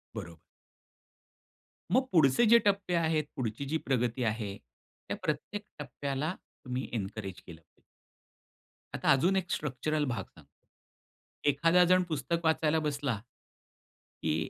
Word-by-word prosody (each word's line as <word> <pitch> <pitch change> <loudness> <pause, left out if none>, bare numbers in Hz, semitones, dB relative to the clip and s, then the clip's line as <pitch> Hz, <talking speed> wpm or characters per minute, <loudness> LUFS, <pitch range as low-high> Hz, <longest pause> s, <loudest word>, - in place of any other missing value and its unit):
बरोबर. 85 -6 -7 1.6
मग 260 +1 +4
पुढचे 160 - +5
जे 235 +2 +8
टप्पे 195 -3 +1
आहेत, 160 -2 +2
पुढची 120 +2 -3
जी 155 +4 0
प्रगती 125 -1 0
आहे, 105 -3 -2
त्या - - -11
प्रत्येक 155 +7 -2 0.2
टप्प्याला 140 +3 -3 0.3
तुम्ही 125 +1 -3
एन्करेज 95 -3 -4
केलं 85 -2 -11
पाहिजे. - - -37 1.1
आता - - +2
अजून 170 +8 +4
एक 180 -2 -1
स्ट्रक्चरल 150 +2 -1
भाग 120 -4 -2
सांगतो. 75 -4 -18 1.0
एखादा 165 +5 +4
जण 185 +1 +4
पुस्तक 155 +2 -1
वाचायला 160 0 +3
बसला, 145 -5 -1 1.1
की 80 0 0
140 Hz, 120 wpm, -30 LUFS, 115-160 Hz, 1.6 s, जे